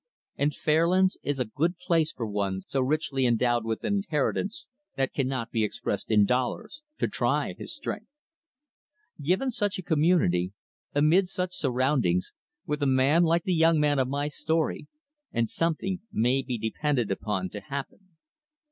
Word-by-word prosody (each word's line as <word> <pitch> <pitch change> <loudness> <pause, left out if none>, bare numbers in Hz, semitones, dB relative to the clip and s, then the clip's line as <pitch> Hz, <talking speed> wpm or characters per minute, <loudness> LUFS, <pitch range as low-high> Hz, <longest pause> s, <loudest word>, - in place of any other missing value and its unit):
And 145 +1 +1
Fairlands 175 +5 +2
is 145 -1 -2
a 125 - +1
good 165 +10 -1
place 165 -3 +1
for 115 - -4
one 100 -3 -2
so 135 - -1
richly 135 -1 +1
endowed 120 0 +2
with 110 -1 -3
an 205 - +1
inheritance 195 - -1 0.3
that 135 -1 -1
cannot 130 -3 -2
be 110 -2 +1
expressed 105 - -3
in 105 -2 +5
dollars 130 - -2 0.2
to - - +1
try - - 0
his - - -6
strength. - - -5 1.1
Given 185 - +1
such 205 -3 -1
a 185 - -6
community, 150 - +2 0.4
amid 165 +6 +4
such 180 -1 -3
surroundings, 130 - +1 0.3
with 150 -3 -2
a 140 - +2
man 135 +5 +4
like 170 0 +3
the 185 - 0
young 165 -1 +4
man 145 -2 +2
of 130 - +2
my 140 +2 -1
story, 160 0 -1 0.4
and 115 -1 +1
something 170 - -1
may 125 +4 +2
be 125 -2 -3
depended 120 +1 -1
upon 95 -2 -2
to 105 - -5
happen. 140 - -7
145 Hz, 155 wpm, -27 LUFS, 120-170 Hz, 1.1 s, in